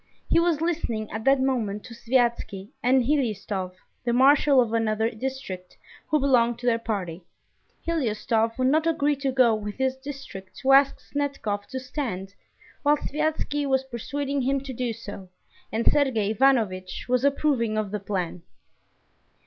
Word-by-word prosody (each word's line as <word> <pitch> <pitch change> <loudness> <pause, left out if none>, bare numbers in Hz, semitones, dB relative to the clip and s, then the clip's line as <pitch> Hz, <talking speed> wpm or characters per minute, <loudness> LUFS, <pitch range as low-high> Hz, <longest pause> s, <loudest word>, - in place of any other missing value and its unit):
He - - +4
was 335 -3 +2
listening 305 -11 -2
at 220 +1 -5
that 270 0 +5
moment 225 -6 -1
to 245 - -10
Sviazhsky 235 -5 0
and 255 +1 +4
Hliustov, 210 -9 -1 0.3
the 240 -1 0
marshal 275 +2 +5
of 235 -3 +2
another 225 0 +1
district, 220 -7 -6 0.3
who 305 - +2
belonged 240 -4 +3
to 245 - -9
their 230 -2 +3
party. 190 -7 -3 0.6
Hliustov 230 -7 0
would 255 0 +2
not 315 +3 +2
agree 295 -3 +2
to 275 -1 -1
go 255 -3 +4
with 210 -1 -4
his 265 0 0
district 265 -8 -9
to 270 - +3
ask 275 0 +6
Snetkov 275 -8 -3
to 260 - -5
stand, 230 -8 -4 0.5
while 295 +1 +4
Sviazhsky 295 -1 -1
was 265 -1 +2
persuading 275 +3 -3
him 270 +2 +1
to 270 -1 -7
do 245 -1 -2
so, 205 -4 -9 0.4
and 225 +2 -1
Sergey 240 -8 +2
Ivanovitch 215 -7 +1
was 250 0 +1
approving 275 -6 +1
of 210 -2 -2
the 210 - -2
plan. 180 -3 -3
250 Hz, 155 wpm, -25 LUFS, 215-275 Hz, 0.6 s, ask